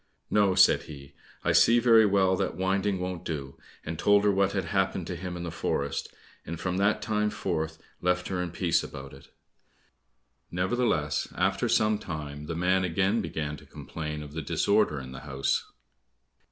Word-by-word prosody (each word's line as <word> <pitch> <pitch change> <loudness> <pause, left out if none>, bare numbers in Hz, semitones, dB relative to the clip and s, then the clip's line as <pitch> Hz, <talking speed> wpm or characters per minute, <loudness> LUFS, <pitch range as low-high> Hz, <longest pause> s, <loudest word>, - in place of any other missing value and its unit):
"No," 100 -3 +3
said 90 - +6
he, 70 -2 -11 0.3
"I - - +2
see 115 - +6
very 115 -2 +6
well 95 -1 +3
that - - -2
winding 95 +1 0
won't 90 -1 -4
do," 70 -5 -5 0.3
and 80 0 -5
told 100 0 +4
her 105 - +4
what 100 0 +1
had 95 -3 -1
happened 95 -1 0
to 90 - -4
him 90 +1 -5
in 85 - -5
the 85 - -4
forest, 70 -2 -2 0.3
and 85 +1 -6
from 90 0 -2
that 100 +2 +2
time 105 -1 0
forth 80 -4 -3 0.2
left 90 0 +1
her 90 -1 -1
in 90 - -3
peace 85 -1 +1
about 70 0 -8
it. 70 - -14 1.2
Neverthless 90 -6 0
after 95 +6 +1
some 110 -2 +3
time, 75 -3 -6
the 85 - -3
man 90 +2 +2
again 95 +5 +1
began 75 -6 -3
to - - -15
complain 75 -1 -6
of 75 -1 -11
the 80 - -3
disorder 100 +1 +1
in 65 -1 -8
the 65 - -8
house. 70 -1 -2
90 Hz, 180 wpm, -28 LUFS, 75-100 Hz, 1.2 s, said